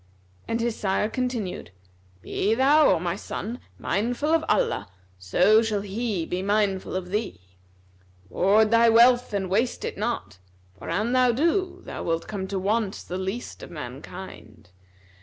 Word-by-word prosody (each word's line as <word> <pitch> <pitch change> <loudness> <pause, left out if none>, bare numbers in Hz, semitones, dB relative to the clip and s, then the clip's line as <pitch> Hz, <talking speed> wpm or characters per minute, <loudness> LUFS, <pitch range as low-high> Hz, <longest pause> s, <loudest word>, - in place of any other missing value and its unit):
And 230 - -1
his 235 -1 -1
sire 195 +1 0
continued, 245 -5 -3 0.5
"Be 215 +3 0
thou, 285 +4 +5
O - - +3
my 170 0 -2
son, 230 +6 -6 0.2
mindful 245 - -1
of 325 -1 +3
Allah, 100 - +1 0.3
so 180 - +4
shall 215 -3 -1
He 205 -3 -2
be 180 +2 -3
mindful 200 -2 0
of 185 -1 -4
thee. 210 - -2 0.9
Ward 210 - +3
thy 230 0 +6
wealth 245 +2 +5
and 200 -2 -1
waste 220 +7 0
it - - -5
not; 95 +2 -3 0.4
for - - -9
an 210 +8 0
thou 255 -1 +4
do, 340 - 0
thou - - -7
wilt 165 0 -2
come 195 -3 -4
to 195 - -3
want 205 +1 0
the 180 +1 -3
least 190 - -5
of - - -9
mankind. 90 - -9
210 Hz, 155 wpm, -25 LUFS, 190-240 Hz, 0.9 s, thy